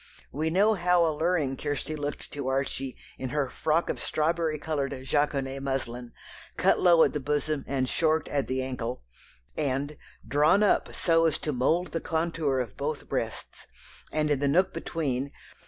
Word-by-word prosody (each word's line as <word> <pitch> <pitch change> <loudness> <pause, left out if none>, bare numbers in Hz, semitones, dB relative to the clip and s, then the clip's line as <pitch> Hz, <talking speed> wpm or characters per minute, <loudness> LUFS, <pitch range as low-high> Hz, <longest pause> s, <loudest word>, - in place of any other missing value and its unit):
We 155 +3 -1
know 200 +6 +4
how 180 -3 +3
alluring 160 -3 0
Kirstie 145 +1 -3
looked 145 -1 -5
to 140 -2 -4
Archie 135 -1 -1 0.2
in 130 - -3
her 140 -2 -1
"frock 160 +5 +1
of - - -2
straw 155 +2 +1 0.3
coloured 145 -3 -2
jaconet 135 -1 0
muslin, 125 -3 -3 0.5
cut - - +3
low 170 -2 +6
at - - +2
the 150 - -1
bosom 145 +1 -1
and 130 -2 0
short 160 +3 +1
at 140 -2 -1
the 130 0 -1
ankle," 125 - -4 0.5
and 145 0 -1 0.3
"drawn 150 - +4
up 205 - +2
so 165 -1 +3
as 160 - +2
to 150 - -3
mould 165 +8 +1
the 165 - -3
contour 160 -4 0
of 115 -5 -4
both 145 +1 -3
breasts, - - -4 0.4
and 155 0 +1
in 145 - +2
the 140 - +1
nook 185 +7 +3
between 140 -4 -2
145 Hz, 165 wpm, -28 LUFS, 135-160 Hz, 0.5 s, low